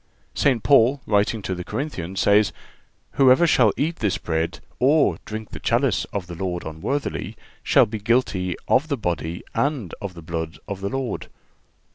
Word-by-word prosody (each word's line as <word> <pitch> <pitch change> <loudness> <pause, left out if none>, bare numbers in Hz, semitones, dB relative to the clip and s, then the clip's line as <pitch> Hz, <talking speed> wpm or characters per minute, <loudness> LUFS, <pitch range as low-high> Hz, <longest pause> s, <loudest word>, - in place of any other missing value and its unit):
St. 130 -6 +2
Paul, 135 0 +5
writing 105 +1 +1
to 95 - -2
the 90 -1 -5
Corinthians, 95 - -4
says: 100 0 +4 0.6
"Whosoever 135 +4 +5
shall 125 -9 +4
eat 165 +3 -1
this 105 -4 0
bread, 80 0 -2 0.2
or 145 +4 +3
drink 110 0 -6
the - - -7
chalice 120 -2 +1
of 100 -3 -5
the 90 - -8
Lord 90 0 -3
unworthily, 80 - -3 0.2
shall - - +5
be 110 +1 -5
guilty 100 -6 +1
of 145 - +3
the 140 -3 -1
body 85 -4 -3
and 140 - -1
of 100 -3 -5
the 85 - -10
blood 80 0 -4
of 100 -2 -5
the 100 - -2
Lord." 135 -3 -3
105 Hz, 165 wpm, -23 LUFS, 90-130 Hz, 0.6 s, Paul